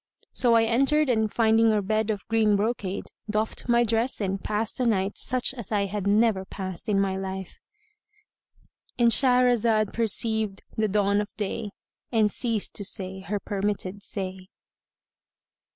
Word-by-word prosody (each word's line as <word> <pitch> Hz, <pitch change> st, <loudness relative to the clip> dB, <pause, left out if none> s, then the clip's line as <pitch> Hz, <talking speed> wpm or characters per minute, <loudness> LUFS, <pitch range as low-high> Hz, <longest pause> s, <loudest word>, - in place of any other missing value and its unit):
So 240 Hz, -2 st, +3 dB
I 225 Hz, -, +5 dB
entered 275 Hz, +6 st, +2 dB
and 220 Hz, -2 st, +1 dB
finding 225 Hz, 0 st, +3 dB
a 215 Hz, -, +2 dB
bed 215 Hz, +2 st, 0 dB
of 205 Hz, -3 st, -3 dB
green 220 Hz, -2 st, +3 dB
brocade, 200 Hz, -2 st, -2 dB, 0.3 s
doffed 215 Hz, +3 st, -2 dB
my 240 Hz, 0 st, +4 dB
dress 230 Hz, +2 st, 0 dB
and 195 Hz, -2 st, -2 dB
passed 215 Hz, +3 st, -2 dB
a 250 Hz, -, +1 dB
night 195 Hz, -3 st, 0 dB
such 255 Hz, 0 st, 0 dB
as 235 Hz, -6 st, -8 dB
I 205 Hz, -2 st, +1 dB
had 200 Hz, 0 st, -3 dB
never 210 Hz, -1 st, +3 dB
passed 190 Hz, 0 st, -6 dB
in 200 Hz, -2 st, +2 dB
my 195 Hz, -1 st, 0 dB
life.——And 420 Hz, -, -6 dB
Shahrazad 240 Hz, -4 st, +3 dB
perceived 220 Hz, -2 st, 0 dB
the 220 Hz, 0 st, +1 dB
dawn 205 Hz, 0 st, +2 dB
of 210 Hz, -, -5 dB
day 210 Hz, +1 st, -3 dB, 0.4 s
and 220 Hz, -3 st, +3 dB
ceased 230 Hz, -4 st, -1 dB
to 205 Hz, -, -2 dB
say 190 Hz, -1 st, -1 dB
her 195 Hz, +3 st, -3 dB
permitted 200 Hz, -1 st, -3 dB
say. 190 Hz, -2 st, -6 dB
215 Hz, 150 wpm, -26 LUFS, 200-235 Hz, 0.4 s, I